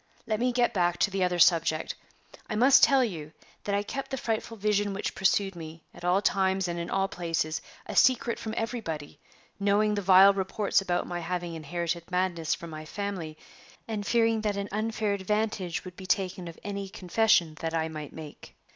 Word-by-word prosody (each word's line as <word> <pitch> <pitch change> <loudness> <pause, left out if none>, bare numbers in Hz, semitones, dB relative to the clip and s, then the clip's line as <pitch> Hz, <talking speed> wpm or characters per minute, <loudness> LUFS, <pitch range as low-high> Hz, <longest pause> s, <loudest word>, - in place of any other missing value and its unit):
Let 215 -1 -1
me 250 +1 +2
get 245 0 +1
back 175 -2 +1
to 205 - +2
the 190 -1 0
other 180 -1 +1
subject. 165 -2 +3 0.6
I 215 - -2
must 255 +5 +6
tell 270 -2 +6
you 160 -9 -5 0.3
that 200 - 0
I 200 - 0
kept 270 +6 -5
the 265 - -3
frightful 225 -1 -3
vision 205 -1 0
which 200 - -3
pursued 195 0 +1
me, 165 -1 -9
at - - -14
all 180 +3 +2
times 190 -1 +1
and 170 0 -3
in 170 - -4
all 195 0 +1
places, 165 -4 -2 0.2
a - - -6
secret 240 -2 +3
from 220 0 -5
everybody, 195 - -4 0.4
knowing 205 +1 +2
the 205 - -1
vile 195 +1 +7
reports 195 +1 0
about 175 -2 -1
my 175 -1 -4
having 175 0 -3
inherited 170 +1 -4
madness 180 -3 0
from 170 -1 -9
my 155 0 -7
family, 175 -3 -5 0.5
and 215 -2 -3
fearing 225 -1 +2
that 210 -2 -1
an 200 0 -3
unfair 215 0 -1
advantage 200 -3 -2
would 180 -1 -9
be 190 0 -9
taken 185 -1 -1
of 165 - -9
any 200 -1 -4
confession 185 -3 +2
that 165 0 -3
I 160 0 0
might 155 -2 -7
make. 155 -2 -11
190 Hz, 190 wpm, -28 LUFS, 170-210 Hz, 0.6 s, vile